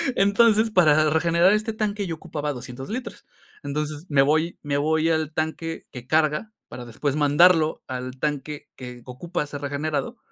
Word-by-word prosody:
Entonces, 220 +2 +4
para 155 -5 +4
regenerar 170 +4 +3
este 215 +1 -1
tanque 210 -2 -2
yo 165 - -3
ocupaba 150 -3 -4
200 125 +1 -8
litros. 240 +2 -6 0.4
Entonces, 150 +2 -4
me 140 -2 +4
voy 155 +4 +1
me 145 -1 -1
voy 160 +2 +1
al 160 -1 0
tanque 160 +1 -3
que 125 -2 -10
carga 155 +7 +1 0.2
para 120 0 -9
después 130 +5 -3
mandarlo 155 +2 +4
al 130 0 -6
tanque 150 0 -3
que 125 -1 -9
ocupa 150 +6 -4
ser 145 -1 -7
regenerado 150 - -3
155 Hz, 155 wpm, -24 LUFS, 145-175 Hz, 0.4 s, Entonces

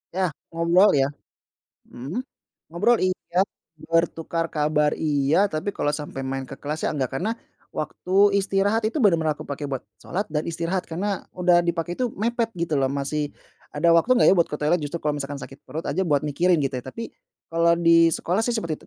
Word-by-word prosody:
Ya, 185 -3 +1 0.2
ngobrol, 170 +4 +4
ya. 135 -1 +3 0.8
Mhm. 145 - -5 0.5
Ngobrol, 205 +8 +3
iya, 185 0 +1 0.5
bertukar 165 0 0
kabar, 150 -1 +1
iya, 155 +6 +2
tapi 155 +6 -3
kalau 145 - 0
sampai 145 -2 -5
main 135 0 -3
ke 135 - -8
kelas, 150 +2 -3
sih, - - +2
enggak, 135 -5 -2
karena 215 +6 -1 0.4
waktu 180 - -5 0.3
istirahat 200 +3 +1
itu 255 +5 -2
bener-bener 165 -7 +3
aku - - -8
pake 145 +1 -5
buat 135 -2 -3 0.2
sholat 195 0 -4
dan 150 0 -1
istirahat, 170 +2 -2
karena 190 +4 -3
udah 180 -1 +4
dipakai 170 +1 -2
itu 250 - +1
mepet, 230 +2 0
gitu, 165 -3 0
loh, 135 - +2
masih 145 +2 -2 0.4
ada 165 +3 +3
waktu 170 +10 +4
nggak, - - +5
ya, - - +6
buat 170 - +3
ke 150 - -4
toilet, 150 +4 +2
justru 150 +3 -4
kalau 150 -1 0
misalkan 140 +1 -4
sakit 135 +2 -10
perut 155 +5 -5
aja 190 - -1
buat 145 -3 +2
mikirin, 170 +4 +2
gitu, 135 -1 -1
ya. 125 - -9
Tapi 230 - -6 0.4
kalau 170 0 +3
di 165 0 +5
sekolah, 180 +5 0
sih, 240 - 0
seperti 165 -8 -4
165 Hz, 190 wpm, -24 LUFS, 150-185 Hz, 0.8 s, ya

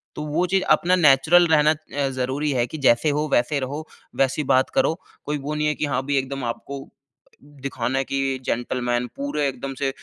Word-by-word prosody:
तो - - -5
वो 165 +5 +1
चीज़ 190 +1 +1
अपना 180 +1 +4
नेचुरल 160 +2 +5
रहना 155 -1 +4
अ, 145 -2 -3
ज़रूरी 135 +4 -1
है 120 -2 +1
कि 155 - -7
जैसे 130 +2 +3
हो 150 +1 0
वैसे 140 +4 +2
रहो, 145 +4 -5 0.3
वैसी 135 +3 +1
बात 130 0 +3
करो, 160 - +3 0.3
कोई 150 0 -1
वो 145 +2 -4
नहीं 150 0 0
है 150 - 0
कि 150 - -1
हाँ, 135 -2 -1
भई 140 - +1
एकदम 135 0 -2
आपको 140 +2 -9 0.6
दिखाना 135 -3 -4
है - - +1
कि 135 -1 -1
जेंटलमैन 120 0 -1
पूरे 275 - -1
एकदम 135 +1 -5
से 140 - +1
140 Hz, 195 wpm, -23 LUFS, 130-150 Hz, 0.6 s, नेचुरल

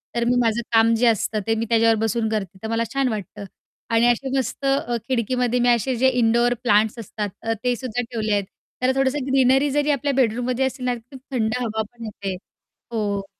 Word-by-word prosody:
तर 235 - +1
मी 245 +1 +2
माझं 230 0 +1
काम 225 0 +5
जे 240 +2 +2
असतं 215 -1 +1
ते 225 - +2
मी 225 +1 -1
त्याच्यावर 225 -1 +4
बसून 225 0 0
करते. 200 -3 -3
तर - - -2
मला 230 +1 0
छान 275 -1 +1
वाटतं, 205 -2 -5 0.5
आणि 230 +1 +3
असे 265 +3 -2
मस्त 265 +1 -3 0.4
खिडकीमध्ये 250 0 0
मी 245 0 +3
असे 240 +2 +2
जे 260 +3 +3
इंडोअर 240 0 +2
प्लांट्स 215 0 +3
असतात 210 -1 -4
अ, 225 0 -1
ते 245 -1 +1
सुद्धा 245 0 -3
ठेवले 225 -3 -3
आहेत. 200 -1 +1 0.4
त्याला 255 +1 +2
थोडसं 270 0 0
ग्रीनरी 270 +1 +3
जरी 295 +1 +1
आपल्या 280 0 0
बेडरूममध्ये 250 +1 +1
असेल 260 -1 -4
ना, 250 - +1
तर - - -9 0.2
खूप - - -9
थंड 220 -3 0
हवा 220 -2 -2
पण 235 -1 -12
येते. 200 -3 -5 0.6
हो, 205 -3 -2
235 Hz, 200 wpm, -22 LUFS, 220-255 Hz, 0.6 s, काम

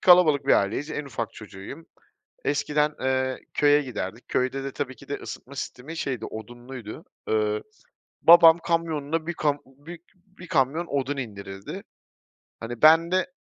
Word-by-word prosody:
kalabalık 170 -7 +6
bir - - +5
aileyiz, 110 +10 +1
en 150 -1 -3
ufak 115 -5 -4
çocuğuyum. 105 +8 -10 0.6
Eskiden, 150 +1 +1
eee, 130 0 0
köye 145 0 +4
giderdik, 120 -4 -6
köyde 130 +2 -1
de 135 - -4
tabii 130 -2 -4
ki - - -16
de 145 - -2
ısıtma 140 - -9
sistemi, 140 +4 -6
şeydi, 130 -7 -3
odunluydu. 120 +1 -9 0.2
Iıı, 105 -1 +1 0.6
babam 165 0 +9
kamyonuna 165 -2 -1
1 175 - -2
kam 145 -2 0
bi 145 +6 -12 0.2
bir 185 -1 -16
kamyon 145 +5 +1
odun 140 -1 -1
indirirdi. 100 -6 -7 0.8
Hani, 115 +1 -7
ben 165 +2 +7
de 185 0 +2
140 Hz, 145 wpm, -25 LUFS, 120-160 Hz, 0.8 s, babam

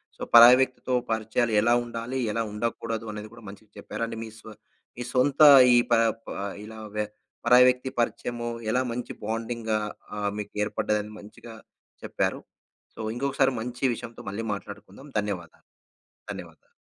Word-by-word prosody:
So, - - -19
పరాయి 120 +2 +10
వ్యక్తితో 130 0 -2 0.2
పరిచయాలు 110 +1 0
ఎలా 120 +2 +3
ఉండాలి, 120 +2 -5
ఎలా 115 - -1
ఉండకూడదు, 115 +1 -3
అనేది 105 0 -8
కూడా 115 0 -14
మంచిగా 105 +1 -14
చెప్పారు - - -7
అండి. 115 - -6
మీ 110 - -8
సొ 110 - -12 0.5
మీ 125 - -4
సొంత 135 +3 +2 0.3
ఈ - - +6 0.2
ప - - +6 0.3
ప - - -10 0.3
ఇలా 110 +1 -10 0.2
వ్య 105 - 0 0.4
పరాయి 125 +1 +7
వ్యక్తి 125 +1 +1
పరిచయము 120 0 -2 0.2
ఎలా 125 +4 +2
మంచి 120 +1 -5
బాండింగ్‌గా 115 0 -2 0.4
ఆహ్, 105 -1 -1
మీకు 105 - -7
ఏర్పడ్డదని 105 0 -2
మంచిగా 110 +3 -12 0.5
చెప్పారు. - - -2 0.5
సో, - - -17 0.2
ఇంకొకసారి 135 +1 +1
మంచి 125 +2 -7
విషయంతో 115 0 -9
మళ్ళీ 105 +3 -4
మాట్లాడుకుందాం. 100 +5 -10
ధన్యవాదాలు, 95 -5 -6 0.6
ధన్యవాదాలు. - - -11
115 Hz, 145 wpm, -26 LUFS, 105-120 Hz, 0.6 s, పరాయి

